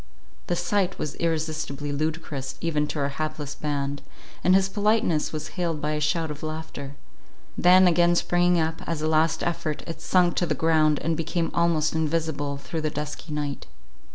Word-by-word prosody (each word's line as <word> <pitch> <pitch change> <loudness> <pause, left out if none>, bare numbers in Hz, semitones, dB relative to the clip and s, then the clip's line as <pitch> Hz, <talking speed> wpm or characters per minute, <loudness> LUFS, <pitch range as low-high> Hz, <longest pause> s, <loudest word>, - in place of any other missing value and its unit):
The 175 - +1
sight 185 +2 0
was 150 - -3
irresistibly 155 -3 -2
ludicrous 145 -2 -3
even 150 -3 0
to - - -5
our 140 -1 0
hapless 150 0 -4
band, 145 -1 -3 0.4
and 185 - +5
his 190 0 +4
politeness 205 -5 +1
was 155 -1 -5
hailed 170 -4 -2
by 150 0 -1
a 150 - -1
shout 160 +1 0
of 150 - -8
laughter;—then, 160 +4 0
again 175 0 +4
springing 175 0 +3
up, 160 0 -1
as 160 -2 -2
a - - +1
last 160 +1 +2
effort, 160 -3 -2
it 165 -1 -7
sunk 180 0 +3
to 175 - +2
the 155 - 0
ground, 155 -1 +3
and 165 +2 +1
became 165 +1 -1
almost 165 -2 +2
invisible 155 -3 -1
through 160 +3 -5
the 155 - 0
dusky 150 +2 -6
night. 145 -1 -3
160 Hz, 170 wpm, -25 LUFS, 150-170 Hz, 0.4 s, and